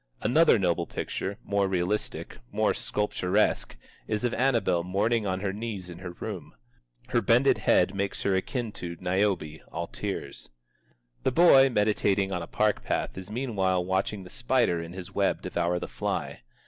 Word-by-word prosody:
Another 130 +5 +5
noble 85 -3 0
picture, 100 +2 -4
more 100 -1 +1
realistic, 95 +2 -2
more - - +2
sculpturesque, 105 - 0 0.3
is 110 +1 -1
of 120 - 0
Annabel 115 -9 +2
mourning 105 +4 +1
on 95 0 -1
her 100 -1 -1
knees 100 -4 -5
in 85 - -10
her 90 0 -6
room. 95 -4 -7 0.5
Her - - +2
bended - - +4
head - - +3
makes 100 0 -2
her 100 - +2
akin 115 +4 -1
to 85 -4 -6
"Niobe, 90 -4 0
all - - -3
tears." - - -5 0.7
The 130 - +1
boy 135 -3 +7
meditating 105 -3 +1
on 90 -2 -2
a 85 - -6
park 105 -1 +1
path - - -2
is 95 0 -8
meanwhile 100 -7 0
watching 95 +2 -1
the 90 - -12
spider 120 -9 +1
in 85 +1 -8
his 90 -1 -8
web - - +1
devour 85 +1 0
the - - -4
fly. - - -3
100 Hz, 160 wpm, -27 LUFS, 90-110 Hz, 0.7 s, boy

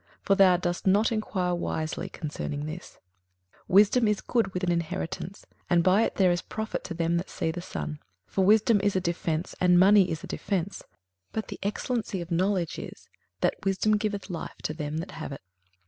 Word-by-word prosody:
for 200 - +3
thou 190 -2 +6
dost 175 +1 -2
not 205 +4 +4
enquire 190 -5 -1
wisely 160 -2 -3
concerning 145 -1 -4
this. 160 +3 -8 0.7
21:007:011 - - -6
Wisdom 210 +4 +6
is 210 -1 +1
good 230 -5 0
with 180 0 -4
an 175 - +2
inheritance: 170 +2 -3 0.2
and 175 -1 +4
by 185 +4 +5
it - - 0
there 185 -2 +4
is 175 - 0
profit 220 0 -4
to 170 - -6
them 170 0 +1
that 175 - -3
see 160 - -2
the 175 +2 -5
sun. 75 - -5 0.3
21:007:012 - - -29
For 195 - +2
wisdom 215 +1 +5
is 205 -1 +1
a - - +3
defence, 170 -2 -2
and 180 -1 +5
money 195 0 +6
is 160 - -4
a - - -4
defence: 195 -1 -2 0.5
but 220 - -4
the - - -7
excellency 210 0 -2
of 170 0 -7
knowledge 180 -1 0
is, - - -10 0.3
that - - 0
wisdom 195 +2 +2
giveth 205 -2 -3
life 170 - -5
to 155 - -2
them 150 -1 -4
that 165 +3 -5
have 160 -2 -6
it. 140 - -7
185 Hz, 200 wpm, -27 LUFS, 170-205 Hz, 0.7 s, thou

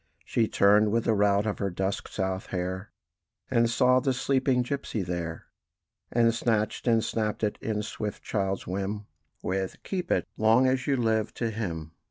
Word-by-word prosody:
She 115 -2 +1
turned, 105 +1 +4
with 115 +1 +2
the 115 - +2
rout 100 0 +3
of 105 - -2
her 100 - 0
dusk 95 +2 -2
South 95 0 -3
hair, 95 +2 -3 0.6
And 115 -2 +3
saw 125 +2 +4
the 130 +1 +1
sleeping 130 -1 +1
gipsy 125 -5 -3
there; 85 -2 -4 0.7
And 115 -1 +4
snatched 115 -1 0
and 115 -2 +4
snapped 110 -2 -2
it 105 - 0
in 105 -1 -2
swift 105 -1 -5
child's 95 -2 -1
whim, 100 +3 -3 0.4
With 95 +1 -2
"Keep 180 -2 -3
it, - - +1
long 110 +4 +5
as 130 -1 +1
you 140 -2 +2
live!" 110 -2 0
to 115 -2 -1
him. 85 -8 -4
110 Hz, 170 wpm, -28 LUFS, 95-120 Hz, 0.7 s, long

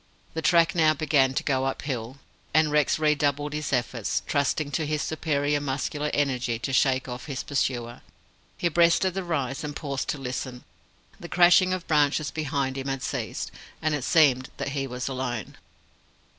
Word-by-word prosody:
The 160 - -3
track 170 +2 +4
now 155 -3 +4
began 140 -3 +2
to - - 0
go 130 -1 +1
uphill, 130 -2 -3 0.4
and 155 -1 +4
Rex 150 -1 +3
redoubled 145 -1 +1
his 150 -1 -3
efforts, 120 -3 -1
trusting 145 +1 0
to 150 +2 -1
his 150 0 -1
superior 145 -2 0
muscular 145 +2 -2
energy 125 -5 0
to 135 +3 -4
shake 130 0 +2
off 125 +2 -7
his 135 -4 -4
pursuer. 120 -4 -2 0.6
He 175 - +1
breasted 170 +3 +3
the 195 0 -3
rise, 140 -6 -2
and 150 -1 -5
paused 140 -3 -3
to - - -1
listen. 125 -1 -5 0.6
The 170 - -9
crashing 180 +1 +5
of 185 -2 -2
branches 150 -1 +2
behind 140 -3 -2
him 135 - -5
had 135 -1 -3
ceased, - - -3 0.3
and 155 -1 0
it 145 -4 -2
seemed 135 -6 +4
that 140 0 -3
he 135 0 -2
was 125 0 -4
alone. 125 -5 -4
145 Hz, 170 wpm, -26 LUFS, 130-155 Hz, 0.6 s, crashing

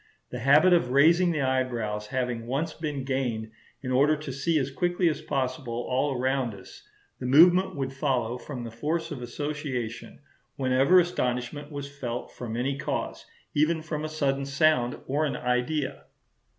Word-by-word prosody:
The 125 - -4
habit 150 +8 +5
of 170 -8 +3
raising 165 +7 +5
the 155 -4 0
eyebrows 120 -5 -1
having 125 -3 -2
once 150 +6 -1
been 150 -4 -4
gained 120 -5 -2 0.3
in 130 - -3
order 145 +4 +4
to 150 -3 -6
see 155 +5 0
as 135 -2 -1
quickly 175 +4 +1
as 155 - -3
possible 130 -3 -2
all 130 +1 0
around 130 -3 0
us, 95 -1 -13 0.4
the 125 - -3
movement 175 +8 +6
would 135 -1 -3
follow 125 -4 -1
from 130 -3 -7
the 115 - -6
force 160 +8 -2
of 140 -4 -5
association 130 -3 -4 0.4
whenever 135 +7 +4
astonishment 145 -3 -2
was 145 -1 -5
felt 120 -2 -4
from 115 -2 -6
any 135 +3 -1
cause, - - -3 0.3
even 155 +2 +2
from 155 -2 -4
a 155 - -3
sudden 140 -3 0
sound 140 -3 +2
or 145 +4 0
an 140 -4 -1
idea. 130 +3 -1
135 Hz, 165 wpm, -27 LUFS, 125-155 Hz, 0.4 s, movement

